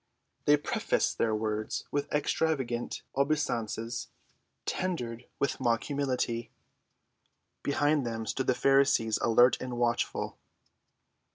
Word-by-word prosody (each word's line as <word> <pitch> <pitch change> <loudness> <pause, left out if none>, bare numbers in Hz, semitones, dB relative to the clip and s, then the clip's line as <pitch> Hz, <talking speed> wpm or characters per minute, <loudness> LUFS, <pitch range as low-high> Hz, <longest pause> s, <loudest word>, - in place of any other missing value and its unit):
They 150 0 +6
prefaced 145 - 0
their 110 -1 +2
words 110 0 -2
with 145 0 -2
extravagant 140 -5 0
obeisances, 120 -5 -1 0.6
tendered 125 -10 -3
with 140 - -1
mock 120 -3 +1
humility. 130 -5 -1 1.1
Behind 145 +1 +2
them 115 -2 -3
stood 130 +4 -2
the 130 - +3
Pharisees 135 -4 +3
alert 120 +2 +5
and 125 -1 -4
watchful. 120 0 -1
125 Hz, 100 wpm, -30 LUFS, 115-140 Hz, 1.1 s, They